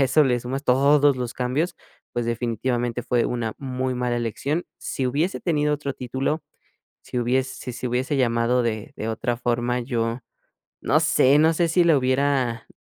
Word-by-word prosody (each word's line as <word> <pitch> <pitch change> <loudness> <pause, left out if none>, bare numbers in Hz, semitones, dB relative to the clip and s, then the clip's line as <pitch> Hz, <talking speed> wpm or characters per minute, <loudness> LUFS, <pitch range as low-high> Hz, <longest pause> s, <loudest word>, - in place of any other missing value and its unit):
a 135 - +6
eso 145 +3 +4
le 125 -2 +2
sumas 130 +4 -4
todos 140 +2 +4
los 125 -2 -4
cambios, 130 +8 -1 0.4
pues, 120 -1 -1
definitivamente 120 +1 -1
fue 120 0 +1
una 120 -2 -2
muy 130 -1 -2
mala 125 -1 -1
elección. 135 +8 -2
Si 130 - -3
hubiese 155 +9 -1
tenido 150 -3 +1
otro 140 -2 -4
título, 130 +5 -2 0.6
si 125 - -5
hubiese 130 +2 0
si 125 - -6
se 125 - -4
hubiese 130 +4 -1
llamado 120 0 +2
de 115 +4 -3
de 110 - -4
otra 120 +1 -2
forma, 120 0 0
yo 115 -1 -2 0.6
no - - +3
sé 135 +3 +4
no 160 +2 +5
sé 170 0 +2
si 175 +2 +3
la 165 -3 +5
hubiera 130 -3 0
125 Hz, 175 wpm, -24 LUFS, 120-140 Hz, 0.6 s, a